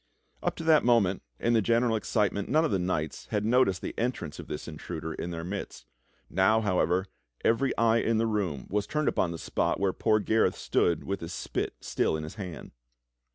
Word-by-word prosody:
Up - - -1
to - - -6
that 160 -2 +5
moment, 115 -6 +3 0.2
in 120 - +2
the 115 - +4
general 115 +2 +2
excitement, 105 -2 0
none 155 +5 +4
of - - -1
the 95 - +1
knights 85 -4 -2
had 105 0 -1
noticed 115 -6 +3
the - - -3
entrance 100 -11 -2
of - - -8
this 75 - -6
intruder 80 0 -6
in 85 - -5
their 85 -1 -5
midst. 90 -8 -6 0.4
Now, 100 +4 +3
how 100 -4 +1
ever, 90 +3 +2 0.4
every 130 +4 +3
eye 115 0 +4
in 115 -1 +1
the 115 - +2
room 95 - -1
was 105 0 0
turned 150 -1 -1
upon 90 - +2
the 85 - -5
spot - - -1
where 95 -1 +1
poor 110 -1 +2
Gareth 110 +1 +2
stood 85 -3 +1
with 100 0 -3
his 85 +1 -6
spit - - -3
still - - 0
in 80 - -5
his 80 - -7
hand. 95 -5 -7
100 Hz, 205 wpm, -28 LUFS, 85-115 Hz, 0.4 s, that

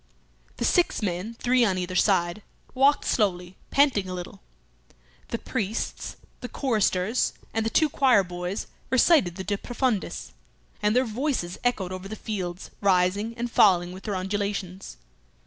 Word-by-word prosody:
The - - -1
six 355 - +2
men, 195 +4 -3
three 250 +1 +2
on 195 -5 +2
either 180 0 -3
side, 175 0 +2 0.3
walked 275 +3 +3
slowly, 180 -4 0
panting 260 -10 +3
a 185 - -4
little. 180 -1 -8 0.9
The 230 - -3
priests, 220 -3 -3 0.2
the 245 - -6
choristers, 220 -4 +1 0.2
and 225 - 0
the 225 - 0
two 310 +7 +3
choirboys 195 -9 +1 0.2
recited 260 - +4
the 190 - -5
De 200 +1 -2
profundis, 245 -4 -2 0.5
and 210 +2 +2
their 255 +1 +4
voices 230 - -2
echoed 215 -7 0
over 185 +1 -6
the 215 - -6
fields, 185 -5 -5
rising 200 +3 +2
and 240 0 -3
falling 180 -5 +4
with 185 +1 -10
their 205 -3 -2
undulations. 195 -1 -3
205 Hz, 145 wpm, -26 LUFS, 185-240 Hz, 0.9 s, recited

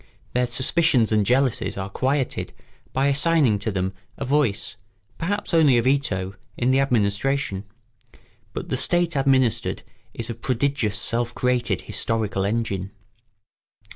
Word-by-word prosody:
Their 125 0 +1
suspicions 130 -3 +2
and 105 -1 +3
jealousies 130 -3 +1
are 95 -1 -3
quieted 135 +3 -1 0.4
by 135 +1 +1
assigning 140 -5 +3
to 110 +2 -2
them 95 -1 -2 0.2
a 140 - -4
voice, 130 -9 +1 0.4
perhaps 200 +3 -2
only 150 -7 +5
a 120 - +2
veto, 105 -9 0 0.2
in 125 +1 +2
the 135 - +3
administration; 115 -3 0 0.9
but - - -5
the - - 0
state 175 -1 +1
administered 130 -4 +1 0.3
is 115 - -4
a 115 - -3
prodigious 125 -4 0
self 120 +3 0
created 120 -6 0
historical 110 -4 -1
engine. 100 -3 -2
125 Hz, 130 wpm, -23 LUFS, 105-140 Hz, 0.9 s, only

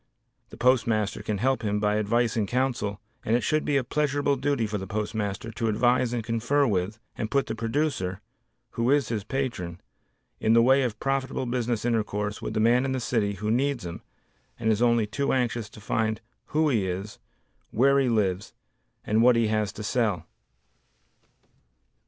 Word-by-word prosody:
The - - -12
postmaster 115 -5 +2
can 105 - -2
help 130 +3 +1
him 105 -2 0
by 105 0 +1
advice 115 +2 +1
and 110 -3 0
counsel 120 -4 -1 0.2
and 110 - +1
it 120 - +2
should 155 0 +1
be 145 - +1
a 135 - +1
pleasurable 145 +1 0
duty 135 -3 0
for 105 -1 -3
the 95 - -6
postmaster 105 0 -3
to 115 +1 -2
advise 120 +3 +2
and 120 -2 -2
confer 120 +6 +1
with, 100 -2 -1 0.2
and 110 - -3
put 140 +2 +1
the 110 - -4
producer 115 -5 -1 0.5
(who 115 +1 0
is 140 -5 +3
his 110 -4 -2
patron), 110 -9 -3 0.6
in 110 - +3
the 115 - +6
way 135 +3 +5
of 120 -5 -2
profitable 135 -1 -1
business 120 -2 -1
intercourse 105 -3 -1
with 110 - -4
the - - +1
man 120 +3 +4
in 135 0 -1
the 130 - -1
city 110 -4 0
who 105 +2 -2
needs 130 -2 0
him 85 0 -6 0.6
and 110 - +2
is 110 +1 0
only 120 -2 +3
too 140 +7 -1
anxious 120 -4 -1
to 105 - -13
find 110 +1 -1 0.3
who 155 +1 +1
he 110 -8 +1
is, 95 +3 -5 0.5
where 140 +4 +4
he 135 -2 +2
lives, 100 -4 0 0.5
and 110 +2 +2
what 125 +1 +6
he 115 -2 +2
has 110 -2 0
to 105 - -7
sell. 105 -6 0
115 Hz, 180 wpm, -26 LUFS, 105-130 Hz, 0.6 s, the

